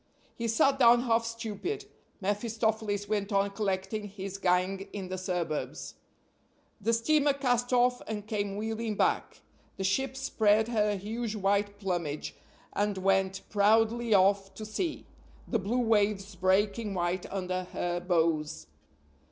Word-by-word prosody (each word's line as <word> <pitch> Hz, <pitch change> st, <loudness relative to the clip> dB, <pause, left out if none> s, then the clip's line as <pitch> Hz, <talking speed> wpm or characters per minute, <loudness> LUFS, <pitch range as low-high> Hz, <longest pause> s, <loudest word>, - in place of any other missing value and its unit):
He 230 Hz, -, -3 dB
sat 270 Hz, +5 st, +3 dB
down 240 Hz, -1 st, +6 dB
half 230 Hz, -2 st, +2 dB
stupid; 230 Hz, -, -4 dB, 0.4 s
mephistopheles 210 Hz, 0 st, -1 dB
went 205 Hz, 0 st, -1 dB
on 200 Hz, 0 st, +2 dB
collecting 200 Hz, +1 st, -2 dB
his 195 Hz, 0 st, -6 dB
gang 185 Hz, +2 st, +1 dB
in 190 Hz, -3 st, -6 dB
the 185 Hz, -, -3 dB
suburbs. 175 Hz, -4 st, -3 dB, 0.9 s
The 225 Hz, +4 st, +1 dB
steamer 285 Hz, +5 st, +3 dB
cast 245 Hz, -3 st, 0 dB
off 250 Hz, 0 st, +3 dB
and 210 Hz, -2 st, -4 dB
came 205 Hz, -2 st, -2 dB
wheeling 220 Hz, 0 st, -2 dB
back; -, -, 0 dB, 0.4 s
the 195 Hz, -, -3 dB
ship 265 Hz, +7 st, 0 dB
spread 220 Hz, -4 st, +2 dB
her 210 Hz, -3 st, +1 dB
huge 220 Hz, +3 st, -4 dB
white 205 Hz, 0 st, +1 dB
plumage, 175 Hz, -7 st, -3 dB, 0.4 s
and 205 Hz, -1 st, 0 dB
went 190 Hz, 0 st, +1 dB
proudly 225 Hz, +3 st, +3 dB
off 195 Hz, 0 st, +3 dB
to 215 Hz, -, -7 dB
sea, 310 Hz, -, -3 dB, 0.4 s
the 230 Hz, -, 0 dB
blue 210 Hz, +6 st, -1 dB
waves 210 Hz, -2 st, +1 dB
breaking 195 Hz, +3 st, +1 dB
white 175 Hz, +1 st, -2 dB
under 185 Hz, -1 st, -2 dB
her 175 Hz, -1 st, -2 dB
bows. 165 Hz, -4 st, 0 dB
205 Hz, 135 wpm, -29 LUFS, 190-225 Hz, 0.9 s, down